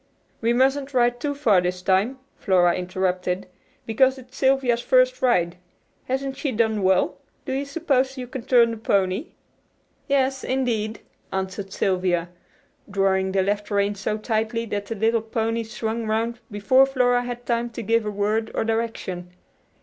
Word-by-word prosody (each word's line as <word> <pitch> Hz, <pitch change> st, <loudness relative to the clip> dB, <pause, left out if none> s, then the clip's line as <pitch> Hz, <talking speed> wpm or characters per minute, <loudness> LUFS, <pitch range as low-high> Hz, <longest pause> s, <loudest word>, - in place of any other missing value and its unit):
"We 230 Hz, +1 st, +2 dB
mustn't 270 Hz, +2 st, +1 dB
ride 245 Hz, 0 st, +3 dB
too 285 Hz, +2 st, -2 dB
far 220 Hz, -10 st, +3 dB
this 180 Hz, 0 st, -3 dB
time," 195 Hz, +8 st, +2 dB, 0.2 s
Flora 180 Hz, -4 st, +3 dB
interrupted, 180 Hz, +1 st, -2 dB, 0.4 s
"because 260 Hz, +4 st, +3 dB
it's 255 Hz, 0 st, -14 dB
Sylvia's 265 Hz, -3 st, +2 dB
first -, -, +3 dB
ride. 180 Hz, -9 st, +2 dB, 0.5 s
Hasn't 270 Hz, +1 st, -2 dB
she 280 Hz, -1 st, -2 dB
done 220 Hz, -2 st, +1 dB
well? 185 Hz, -1 st, +2 dB, 0.3 s
Do -, -, -3 dB
you 275 Hz, +2 st, -1 dB
suppose 275 Hz, -3 st, 0 dB
you 255 Hz, -, -4 dB
can 250 Hz, -1 st, -7 dB
turn 235 Hz, -2 st, +5 dB
the 230 Hz, -, -5 dB
pony?" 200 Hz, -, 0 dB, 0.7 s
"Yes, 270 Hz, -2 st, +1 dB
indeed," 230 Hz, -4 st, -1 dB, 0.3 s
answered 190 Hz, +1 st, -4 dB
Sylvia, 180 Hz, -3 st, 0 dB, 0.6 s
drawing 190 Hz, -1 st, +1 dB
the 190 Hz, 0 st, +2 dB
left 205 Hz, +1 st, -1 dB
rein 200 Hz, 0 st, +1 dB
so 205 Hz, +2 st, -2 dB
tightly 225 Hz, +1 st, -1 dB
that 205 Hz, -2 st, -4 dB
the 225 Hz, -, -4 dB
little 225 Hz, +2 st, +2 dB
pony 225 Hz, +1 st, -1 dB
swung 225 Hz, 0 st, -4 dB
round 225 Hz, +2 st, -1 dB
before 235 Hz, +6 st, +4 dB
Flora 250 Hz, -2 st, +2 dB
had 245 Hz, 0 st, -6 dB
time 235 Hz, 0 st, 0 dB
to 235 Hz, 0 st, -7 dB
give 230 Hz, +1 st, +2 dB
a 210 Hz, -, -2 dB
word 210 Hz, +2 st, -1 dB
of -, -, 0 dB
direction. 225 Hz, -6 st, -3 dB
225 Hz, 155 wpm, -23 LUFS, 195-255 Hz, 0.7 s, turn